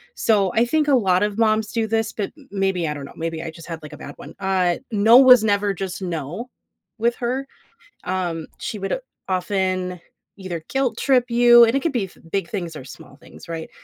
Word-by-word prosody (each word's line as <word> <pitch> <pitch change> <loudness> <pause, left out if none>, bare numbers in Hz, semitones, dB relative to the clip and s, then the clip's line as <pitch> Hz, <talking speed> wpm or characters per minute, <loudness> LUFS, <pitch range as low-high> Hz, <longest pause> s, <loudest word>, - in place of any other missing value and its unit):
so, 200 -5 +2
I 230 - +4
think 300 +4 +1
a 280 - +5
lot 185 -6 +2
of 210 0 -2
moms 215 -1 +2
do 230 -2 0
this- 225 0 0
but 205 -3 -4
m 280 - -18
m 200 - -5
maybe, 190 -4 0
I 150 - -2
don't 140 -1 -7
know, - - -12
maybe 165 0 -4
I 160 - -5
just 165 +1 -13
had, 165 -1 -6
like, 150 - -10
a - - -9
bad 145 - -9
one- 145 - -11
uh, 185 -3 +1
no 220 +3 +6
was 255 -4 +8
never 205 -1 +1
just 190 0 -5
no 175 - -5 0.5
with 235 +1 +1
her. 255 +3 -2 0.6
Um, 175 -4 -2
she 230 -3 -5
would 195 - -2 0.3
often 185 -1 -1 0.4
either 175 -4 -6
guilt-trip 260 -1 +1
you, 240 0 +7
and 230 +3 0
it 275 - +1
could 330 - +1
be 220 -6 0
f 185 - -16
big 195 -4 -1
things 175 -6 -4
or 140 - -8
small - - -13
things, - - -15
right? 165 -1 -6
195 Hz, 215 wpm, -22 LUFS, 175-235 Hz, 0.6 s, was